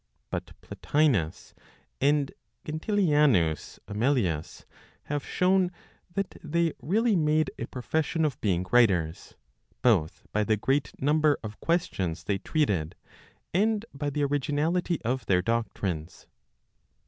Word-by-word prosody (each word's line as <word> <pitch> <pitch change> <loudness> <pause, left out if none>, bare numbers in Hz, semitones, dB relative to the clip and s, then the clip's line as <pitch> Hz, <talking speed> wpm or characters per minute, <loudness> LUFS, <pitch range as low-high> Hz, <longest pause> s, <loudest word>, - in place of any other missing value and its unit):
But - - -5
Plotinos 130 - 0 0.5
and 145 0 +2 0.3
Gentilianus 150 - +2
Amelius, 105 - -1 0.4
have 145 -1 -3
shown 185 0 +2 0.4
that 195 -1 -2
they 165 +1 +1
really 220 +6 +2
made 155 -2 +2
a 115 - -3
profession 160 +5 -1
of 145 -6 -2
being 95 -4 +1
writers, 95 -9 +2 0.5
both 95 -11 +2
by 105 - +1
the 110 0 +2
great 135 +6 0
number 150 +1 +3
of 110 -1 -7
questions 95 - -1
they 100 +1 -1
treated, 95 - 0 0.6
and 215 +4 +2
by 145 +1 -2
the 145 +1 -1
originality 150 +5 0
of 125 +3 -2
their 90 -2 +3
doctrines. 95 -7 -2
140 Hz, 110 wpm, -28 LUFS, 100-155 Hz, 0.6 s, number